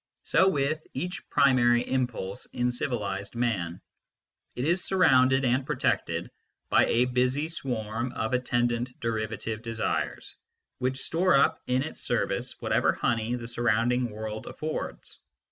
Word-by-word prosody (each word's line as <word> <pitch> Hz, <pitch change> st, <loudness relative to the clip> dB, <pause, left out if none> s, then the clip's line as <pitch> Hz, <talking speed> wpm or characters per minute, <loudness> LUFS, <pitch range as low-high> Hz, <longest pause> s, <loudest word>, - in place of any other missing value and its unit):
So 190 Hz, -, +4 dB
with 155 Hz, -2 st, +1 dB
each 180 Hz, +1 st, -4 dB
primary 120 Hz, -3 st, +4 dB
impulse 125 Hz, -7 st, -2 dB
in 125 Hz, 0 st, -1 dB
civilised 110 Hz, -4 st, -3 dB
man: 95 Hz, -8 st, -1 dB, 0.7 s
it 125 Hz, -, -2 dB
is 175 Hz, +3 st, +2 dB
surrounded 130 Hz, -8 st, +4 dB
and 130 Hz, +2 st, +2 dB
protected -, -, -1 dB, 0.4 s
by -, -, +5 dB
a 120 Hz, +2 st, +3 dB
busy 125 Hz, +4 st, +1 dB
swarm 120 Hz, -6 st, -3 dB
of 110 Hz, +1 st, -2 dB
attendant 120 Hz, 0 st, 0 dB
derivative 110 Hz, -1 st, -3 dB
desires, 115 Hz, -1 st, -3 dB, 0.4 s
which 130 Hz, +1 st, 0 dB
store 180 Hz, +5 st, +2 dB
up 135 Hz, -, +3 dB
in 125 Hz, +1 st, +1 dB
its 155 Hz, -, -6 dB
service -, -, -1 dB
whatever -, -, +2 dB
honey 115 Hz, +1 st, 0 dB
the 120 Hz, -1 st, -6 dB
surrounding 120 Hz, +1 st, +1 dB
world 110 Hz, 0 st, -6 dB
affords. 155 Hz, 0 st, -5 dB
125 Hz, 130 wpm, -27 LUFS, 115-130 Hz, 0.7 s, by